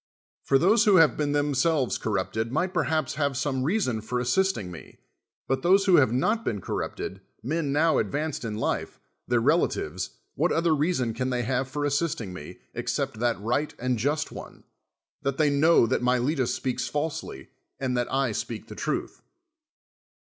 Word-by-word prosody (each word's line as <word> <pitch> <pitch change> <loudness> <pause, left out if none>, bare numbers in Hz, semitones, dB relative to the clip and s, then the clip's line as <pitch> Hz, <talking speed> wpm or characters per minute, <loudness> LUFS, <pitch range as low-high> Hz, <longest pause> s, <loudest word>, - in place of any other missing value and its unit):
For 135 - +4
those 210 - +4
who 205 -2 +6
have 165 -4 +6
been 145 -1 -1
themselves 145 -1 +1
corrupted 110 +2 -2
might 175 +7 0
perhaps 155 -4 0
have 140 -2 0
son:e 140 -2 -1
reason 145 - 0
for 125 +3 -2
assistiirz 125 - +1
me; 85 -3 -11 0.5
but 135 0 0
those 195 +5 +4
who 185 -3 +6
have 130 -6 +4
not 215 - +1
been 105 - -2
corrupted, - - -4 0.2
mea 155 +8 -1
now 150 +2 +2
advanced 145 +9 -2
in 110 -2 -3
life, 110 - -2 0.3
tlioir - - +2
relatives, - - +1 0.2
what - - +1
otlicr 165 -2 +2
reason 145 -8 +1
can 130 +2 -2
they 125 -1 -1
have 130 +2 -1
for 145 +2 -3
as.sisting 145 - -1
me, 75 -5 -9 0.2
exce])t - - -2
that 120 -3 +1
right 120 +8 -1
and 125 -1 -1
just 150 +6 0
one, - - -10 0.6
that 140 0 -2
they 150 -2 +3
knoAV 140 -4 +4
that - - +1
jMiletus 125 +2 +1
speaks 130 +1 -2
falsely 145 - -4 0.3
and 130 -2 -1
that 120 -1 -1
I 135 -2 +1
speak - - -5
the - - -8
truth. - - -3
135 Hz, 170 wpm, -26 LUFS, 125-155 Hz, 0.6 s, who